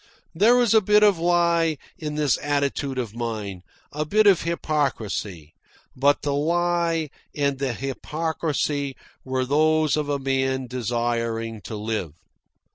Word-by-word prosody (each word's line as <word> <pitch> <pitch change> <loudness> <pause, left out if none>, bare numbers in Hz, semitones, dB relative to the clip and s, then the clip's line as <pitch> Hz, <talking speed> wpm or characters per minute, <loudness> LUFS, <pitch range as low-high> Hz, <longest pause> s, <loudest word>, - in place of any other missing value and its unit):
There 215 +8 +5
was 245 -3 +3
a 220 - +6
bit 210 +1 +4
of 200 -5 +4
lie 170 -2 +2 0.2
in 150 -2 -5
this 150 -4 +1
attitude 140 -1 -1
of 120 -5 -3
mine, 110 -5 -4 0.3
a 150 +1 -2
bit 210 +8 +2
of 195 -4 +6
hypocrisy; 115 - -2 0.4
but 140 +2 +2
the 145 - 0
lie 165 0 0 0.2
and 140 -2 0
the 135 -3 -1
hypocrisy 145 +1 -2 0.3
were 130 -1 -1
those 155 +2 +3
of 150 -1 -2
a 145 - +1
man 135 -1 -1
desiring 115 -2 -2
to 110 - -5
live. 105 -7 -3
145 Hz, 135 wpm, -24 LUFS, 120-165 Hz, 0.4 s, a